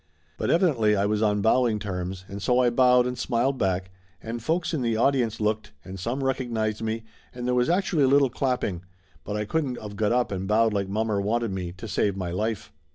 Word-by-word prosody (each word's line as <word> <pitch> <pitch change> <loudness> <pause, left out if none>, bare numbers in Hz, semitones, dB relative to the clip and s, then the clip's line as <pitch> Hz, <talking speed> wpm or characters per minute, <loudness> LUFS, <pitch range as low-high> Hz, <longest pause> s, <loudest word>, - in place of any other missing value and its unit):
But - - -2
evidently 130 - +3
I 100 0 +1
was 105 +1 0
on 105 -2 +2
bowing 115 -1 +3
terms, 95 -2 -5
and 100 +1 -7
so 125 +4 +2
I 125 -1 +4
bowed 125 0 +5
and 125 0 -2
smiled 125 +2 0
back, 95 0 -1 0.3
and 115 +1 -6
folks 165 +7 -1
in 155 - -1
the 115 -2 0
audience 120 -3 +1
looked, 105 -7 -1
and 95 0 -8
some 120 +8 -2
recognized 115 -5 -1
me 110 0 -2 0.3
and 125 -1 -5
there 125 - +1
was 125 +2 +2
actually 175 -5 +2
a - - +3
little 135 -1 +4
clapping, 125 -10 -1 0.4
but 105 - -4
I 105 0 -1
couldn't 135 -1 -1
of 105 -1 -8
got 105 +1 +1
up 125 -2 +1
and 95 0 -3
bowed 110 +1 +3
like 100 -2 -1
mommer 105 0 0
wanted 115 +2 0
me, 90 -2 -4
to 95 +5 -9
save 100 -1 0
my 90 -2 -3
life. 110 +3 -3
110 Hz, 220 wpm, -26 LUFS, 100-125 Hz, 0.4 s, bowed